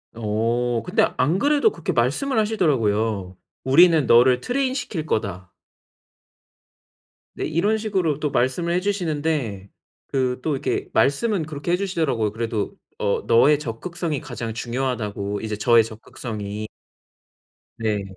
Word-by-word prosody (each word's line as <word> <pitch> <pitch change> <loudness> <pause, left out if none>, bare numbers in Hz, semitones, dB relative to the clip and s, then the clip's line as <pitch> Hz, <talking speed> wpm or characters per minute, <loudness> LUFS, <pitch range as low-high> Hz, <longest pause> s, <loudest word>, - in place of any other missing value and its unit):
어 115 +2 0
근데 - - +3
안 155 +9 +2
그래도 295 +8 +3
그렇게 - - -3
말씀을 275 -3 0
하시더라고요. 110 - 0 0.3
"우리는 160 +1 +5
너를 125 +1 +5
트레인시킬 255 - -2
거다." 95 - -3 1.8
네, - - -3
이런 200 +8 +1
식으로 190 -9 -1
또 150 - -1
말씀을 170 +8 0
해 180 - +2
주시는데 155 - -2 0.4
그 130 -2 -1
또 155 - -1
이렇게 135 - -2
말씀은 170 +4 +1
그렇게 150 +2 -4
해 180 - +3
주시더라고요. 155 - -1
그래도 110 -2 -2 0.2
"어, 100 -1 0
너의 145 +6 +5
적극성이 155 +5 -4
가장 115 -2 -6
중요하다."고 115 -4 -3
이제 110 -1 -4
저의 115 +1 +5
적극성이. 110 -1 -6 1.1
네, 105 -3 -1
130 Hz, 295 characters per minute, -23 LUFS, 110-170 Hz, 1.8 s, 우리는